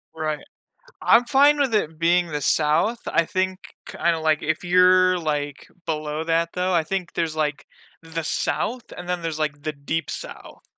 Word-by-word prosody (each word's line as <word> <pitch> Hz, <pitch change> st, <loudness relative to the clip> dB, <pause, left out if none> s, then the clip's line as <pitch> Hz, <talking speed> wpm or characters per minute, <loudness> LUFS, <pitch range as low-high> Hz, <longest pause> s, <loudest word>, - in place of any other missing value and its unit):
Right. 155 Hz, -1 st, -2 dB, 0.6 s
I'm 235 Hz, +1 st, +5 dB
fine 290 Hz, +2 st, +4 dB
with 265 Hz, -5 st, +1 dB
it 160 Hz, -6 st, 0 dB
being 175 Hz, +1 st, +3 dB
the 150 Hz, -2 st, -4 dB
South. 165 Hz, -, +2 dB
I 165 Hz, -, +2 dB
think, 185 Hz, +1 st, -1 dB, 0.3 s
kinda, 170 Hz, -1 st, 0 dB
like, 155 Hz, -1 st, +1 dB
if 160 Hz, +3 st, -2 dB
you're, 185 Hz, +1 st, +5 dB
like, 145 Hz, -3 st, -3 dB, 0.2 s
below 155 Hz, 0 st, -3 dB
that 165 Hz, 0 st, 0 dB
though, 180 Hz, 0 st, 0 dB
I 165 Hz, -2 st, +3 dB
think 185 Hz, +1 st, -4 dB
there's, 165 Hz, -2 st, -2 dB
like, 150 Hz, -1 st, -2 dB, 0.4 s
the 165 Hz, 0 st, -5 dB
South 235 Hz, +9 st, -1 dB
and 180 Hz, 0 st, -9 dB
then 180 Hz, -1 st, -1 dB
there's 165 Hz, -2 st, -3 dB
the 150 Hz, 0 st, -3 dB
Deep 145 Hz, +3 st, -3 dB
South. -, -, -7 dB
165 Hz, 165 wpm, -23 LUFS, 155-185 Hz, 0.6 s, I'm